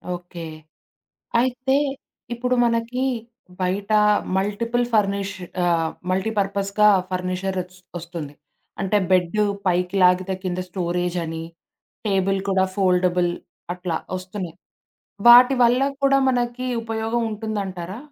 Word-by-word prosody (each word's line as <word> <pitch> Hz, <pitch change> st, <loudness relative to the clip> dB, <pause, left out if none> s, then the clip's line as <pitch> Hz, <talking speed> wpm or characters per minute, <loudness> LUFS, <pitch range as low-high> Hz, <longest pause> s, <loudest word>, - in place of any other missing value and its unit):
Okay. 175 Hz, -1 st, -9 dB, 0.9 s
అయితే 255 Hz, +2 st, +1 dB, 0.6 s
ఇప్పుడు 250 Hz, +1 st, 0 dB
మనకి 235 Hz, +2 st, 0 dB, 0.6 s
బయట 195 Hz, +3 st, -1 dB, 0.4 s
మల్టిపుల్ 230 Hz, +5 st, 0 dB
ఫర్నిష్ 200 Hz, -2 st, +1 dB, 0.3 s
ఆహ్, 165 Hz, -2 st, +2 dB, 0.2 s
మల్టీపర్పస్‌గా 200 Hz, +1 st, +1 dB, 0.2 s
ఫర్నిచర్ 185 Hz, +1 st, -2 dB
ఒస్ 180 Hz, +1 st, -19 dB, 0.2 s
ఒస్తుంది. 165 Hz, -4 st, -7 dB, 0.5 s
అంటే 195 Hz, +2 st, +2 dB
బెడ్డు 185 Hz, +3 st, +3 dB, 0.2 s
పైకి 180 Hz, +1 st, 0 dB
లాగితే 180 Hz, +1 st, +3 dB
కింద 185 Hz, -1 st, -2 dB
స్టోరేజని, 175 Hz, -2 st, -2 dB, 0.6 s
టేబుల్ 195 Hz, -1 st, +1 dB
కూడా 190 Hz, -1 st, +3 dB
ఫోల్డబుల్ 180 Hz, -2 st, +2 dB, 0.4 s
అట్లా 180 Hz, -2 st, -2 dB, 0.2 s
ఒస్తున్నయి. 185 Hz, -2 st, -7 dB, 0.7 s
వాటి 250 Hz, +2 st, +9 dB
వల్ల 245 Hz, +2 st, +4 dB, 0.2 s
కూడా 275 Hz, 0 st, +4 dB
మనకి 245 Hz, 0 st, -1 dB, 0.2 s
ఉపయోగం 225 Hz, +1 st, -2 dB
ఉంటుందంటారా? 200 Hz, -3 st, -4 dB
195 Hz, 95 wpm, -22 LUFS, 180-225 Hz, 0.9 s, వాటి